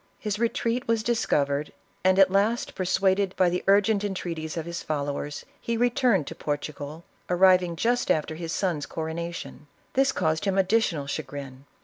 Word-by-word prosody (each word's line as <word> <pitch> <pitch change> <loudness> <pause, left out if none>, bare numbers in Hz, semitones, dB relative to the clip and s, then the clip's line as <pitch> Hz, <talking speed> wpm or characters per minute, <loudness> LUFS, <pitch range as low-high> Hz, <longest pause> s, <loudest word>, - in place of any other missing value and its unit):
His 210 -1 -3
retreat 235 +1 0
was 230 -1 +1
discovered, 150 -11 0 0.3
and 185 0 +4
at 195 -1 +6
last 210 +5 +1
persuaded 190 +1 +1
by 180 -2 +4
the 180 - -2
urgent 205 +1 +4
entreaties 170 -5 -4
of 160 - -3
his 170 0 -5
follow 145 -2 -2
ers, 145 0 -6
he 230 0 -2
returned 240 - +2
to - - -6
Portugal, 145 +1 -5 0.3
arriving 180 -1 +4
just 240 +7 0
after 155 0 +1
his 165 0 -5
son's 170 -7 -1
coronation. 165 -1 -5 0.3
This 270 +1 +3
caused 160 -4 0
him 195 -1 +1
additional 190 -6 +2
chagrin. 140 -2 -6
180 Hz, 155 wpm, -26 LUFS, 155-205 Hz, 0.3 s, at